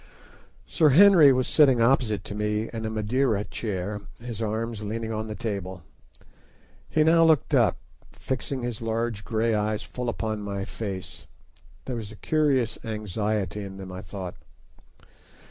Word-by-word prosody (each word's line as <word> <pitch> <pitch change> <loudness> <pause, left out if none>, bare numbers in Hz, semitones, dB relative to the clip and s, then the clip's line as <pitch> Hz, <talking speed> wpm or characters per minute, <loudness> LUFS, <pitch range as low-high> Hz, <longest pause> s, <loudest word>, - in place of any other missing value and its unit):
Sir 155 -4 +3
Henry 170 -1 +8
was 130 -1 +1
sitting 135 -6 +5
opposite 115 -5 +2
to - - -7
me 105 +1 -1
in 110 -1 -4
a - - -1
Madeira 110 0 0
chair, 105 -2 -4 0.2
his 115 -2 -6
arms 110 0 -2
leaning 110 +2 -4
on 110 0 -3
the 110 - -5
table. 95 -4 -5 1.1
He 155 - +3
now 165 +1 +5
looked 160 -4 +3
up, - - +4 0.3
fixing 130 0 -4
his 120 -2 -4
large 115 -1 -2
grey 115 +1 0
eyes 105 0 0
full 125 -1 -4
upon 110 -2 -3
my 100 -1 -4
face. 100 -5 -7 0.6
There 125 -2 -3
was 110 -2 -6
a - - -11
curious 140 -3 +1
anxiety 105 -2 -2
in 95 -1 -8
them, 95 -1 -8
I 90 0 -7
thought. 95 0 -7
110 Hz, 150 wpm, -26 LUFS, 105-125 Hz, 1.1 s, Henry